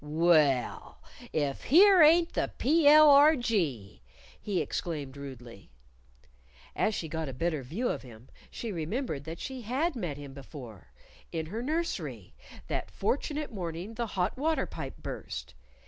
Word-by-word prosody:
"Well, 150 -4 +2 0.3
if 145 -3 -2
here 375 - +7
ain't 330 +2 +5
the - - -1
P.L.R.G.," 280 - +4 0.4
he 200 -4 -1
exclaimed 145 -6 -4
rudely. 125 -7 -10 1.1
As 215 - +1
she 165 - -4
got 160 -1 -4
a - - -6
better 155 +2 -1
view 170 - -3
of - - -2
him 120 0 -14 0.2
she 230 - -6
remembered 165 - -3
that 165 +1 -7
she 265 -1 -6
had 270 +9 -1
met 175 - -4
him 140 -2 -9
before 125 - -11 0.4
in 160 -1 -3
her 210 +8 -5
nursery, 320 +6 -3 0.3
that - - -3
fortunate 300 -2 -2
morning 175 +2 -5
the 235 +1 -3
hot 180 +2 0
water 315 +2 +1
pipe - - -7
burst. - - -7
170 Hz, 135 wpm, -29 LUFS, -, 1.1 s, here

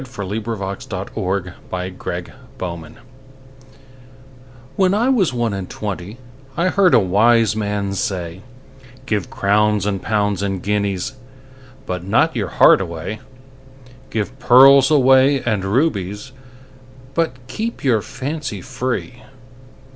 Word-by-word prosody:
1896. 100 -4 -5
XIII. 95 -3 -3
When - - -7
I 90 0 -3
was - - -7
one - - -13
and - - -7
twenty 110 +9 -7 2.3
WHEN 190 -1 +3
I 235 +5 +2
was 225 -10 +2
one 120 -3 -1
and 95 -2 -5
twentyI 125 - -5
heard 195 -3 +4
a - - +7
wise 110 +3 +3
man 100 -2 -2
say,'Give 105 +5 -5
crowns 105 0 +1
and 100 -2 -1
pounds 105 -3 0
and 95 -2 -3
guineasBut 130 +3 -5
not 95 - +2
your - - -1
heart - - +5
away; 85 +4 -5 0.9
Give 115 +4 -4
pearls 135 +2 +7
away 135 -1 +4
and 110 -5 0
rubiesBut 130 - -4
keep 225 - -5
your 120 -6 +2
fancy 140 -5 -5
free. 125 0 -4
115 Hz, 110 wpm, -19 LUFS, 100-130 Hz, 2.3 s, a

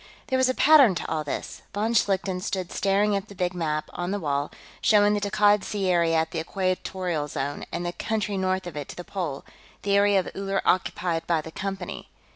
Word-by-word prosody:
There 260 - +2
was 260 0 +3
a 255 - 0
pattern 280 - +7
to - - -4
all 155 -1 -1
this. 145 - -5
Von 220 +3 0
Schlichten 190 -4 +1
stood 185 -1 -3
staring 200 +1 +2
at 200 +1 -3
the 200 - -12
big 180 -1 -1
map, 155 -3 -2
on 175 0 -3
the 205 +1 -1
wall, 145 -3 -1 0.3
showing 210 -1 +5
the 205 - 0
Takkad 205 0 +3
Sea 200 -3 -1
area 170 -2 +3
at 160 0 +1
the 165 - -2
Equatorial 185 -2 -2
Zone, 145 0 -4
and 175 +1 -3
the 175 - -2
country 215 -1 -2
north 190 -1 0
of 175 -4 -7
it 145 -2 -5
to - - -9
the 175 - -7
pole, 170 -8 -4 0.4
the 200 0 +2
area 200 -1 +5
of 185 - -3
Uller 195 0 -1
occupied 175 -2 0
by 170 -2 +2
the 160 +1 -7
Company. 195 +3 -5
190 Hz, 215 wpm, -26 LUFS, 170-205 Hz, 0.4 s, pattern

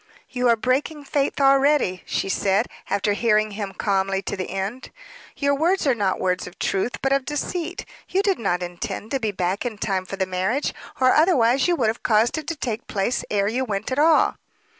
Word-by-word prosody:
"You 250 -1 0
are 235 - +5
breaking 270 +6 -1
faith 280 0 -1
already," 275 -8 +3
she - - -1
said, 195 +3 +1 0.2
after 200 +1 +1
hearing 215 0 +2
him 200 -1 -4
calmly 195 -1 0
to - - -3
the 185 -2 -4
end. 195 +7 -4 0.5
"Your 280 0 +2
words 335 +7 +1
are 270 - +4
not 200 -5 0
words 180 -1 -1
of 180 - -12
truth, 195 +5 -1
but 270 0 +2
of 275 -1 +1
deceit. 325 +5 -3 0.2
You 385 +2 +1
did 395 -2 +1
not 180 -5 0
intend 175 +5 -5
to 270 - 0
be 220 -4 -1
back 185 0 -1
in 235 -4 -4
time 190 -2 -1
for 195 - -5
the 190 -1 0
marriage, 185 +9 -1 0.3
or 255 -1 +5
otherwise 270 -6 +4
you 350 - +3
would 235 -8 +1
have 225 - -3
caused 225 +7 +2
it 310 - -10
to 330 - -2
take 240 -6 -4
place 205 +4 -1
ere 200 -1 +1
you 245 +5 0
went 205 -3 -3
at 260 - 0
all." 315 +1 +4
230 Hz, 205 wpm, -23 LUFS, 195-275 Hz, 0.5 s, are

